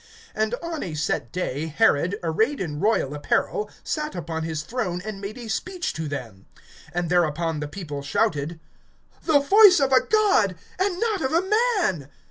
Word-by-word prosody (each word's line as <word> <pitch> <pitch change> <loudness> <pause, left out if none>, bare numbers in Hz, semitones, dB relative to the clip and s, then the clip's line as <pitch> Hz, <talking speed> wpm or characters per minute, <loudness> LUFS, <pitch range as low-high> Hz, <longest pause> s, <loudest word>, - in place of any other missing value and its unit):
(21)And 220 +1 0
on 335 -2 -4
a 165 -5 -4
set 150 -5 -2
day 160 -4 -3
Herod, 170 +1 +2
arrayed 220 - +1
in 150 -5 -4
royal 195 -8 +1
apparel, 285 - -1
sat 300 -5 -3
upon 165 -2 -4
his 160 -1 -3
throne, 180 -3 -3
and 210 -2 -6
made 205 +4 -6
a 240 -2 -8
speech 360 - -3
to 160 0 -4
them. 120 -9 -7 0.5
(22)And 175 -1 -1
thereupon 165 -2 +1
the 150 - -3
people 150 -4 -6
shouted: 145 +2 -1 0.7
The 315 -3 +5
voice 390 +4 +7
of 270 -1 +2
a 260 - +6
god, 400 - +3 0.2
and 375 -2 0
not 435 -4 0
of 265 +1 -1
a 335 +2 +3 0.4
man! 150 - -1
180 Hz, 170 wpm, -24 LUFS, -, 0.7 s, voice